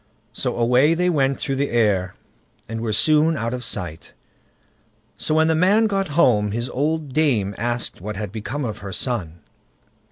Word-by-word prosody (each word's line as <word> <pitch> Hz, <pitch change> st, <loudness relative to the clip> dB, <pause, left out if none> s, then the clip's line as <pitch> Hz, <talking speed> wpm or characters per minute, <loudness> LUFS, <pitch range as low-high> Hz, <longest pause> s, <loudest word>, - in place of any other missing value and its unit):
So 125 Hz, +1 st, -3 dB
away 125 Hz, +7 st, +4 dB
they 180 Hz, +1 st, +1 dB
went 135 Hz, -4 st, +1 dB
through 135 Hz, -, -2 dB
the 140 Hz, +1 st, 0 dB
air, 100 Hz, -6 st, +1 dB, 0.5 s
and 115 Hz, +1 st, -5 dB
were 115 Hz, -2 st, -2 dB
soon 155 Hz, +7 st, +3 dB
out 115 Hz, 0 st, -2 dB
of 125 Hz, -1 st, -4 dB
sight. 85 Hz, -6 st, -6 dB, 1.0 s
So 155 Hz, -, -1 dB
when 160 Hz, 0 st, +4 dB
the 160 Hz, -, +3 dB
man 190 Hz, +7 st, +4 dB
got 195 Hz, -2 st, 0 dB
home, 105 Hz, -9 st, +3 dB
his 120 Hz, +2 st, -3 dB
old 150 Hz, 0 st, -2 dB
dame 120 Hz, -11 st, +1 dB
asked 120 Hz, -2 st, -3 dB
what 105 Hz, +2 st, -5 dB
had 100 Hz, -1 st, -5 dB
become 120 Hz, +6 st, -4 dB
of 110 Hz, -2 st, -5 dB
her 100 Hz, -1 st, -7 dB
son. 90 Hz, -, -3 dB
125 Hz, 170 wpm, -22 LUFS, 105-155 Hz, 1.0 s, away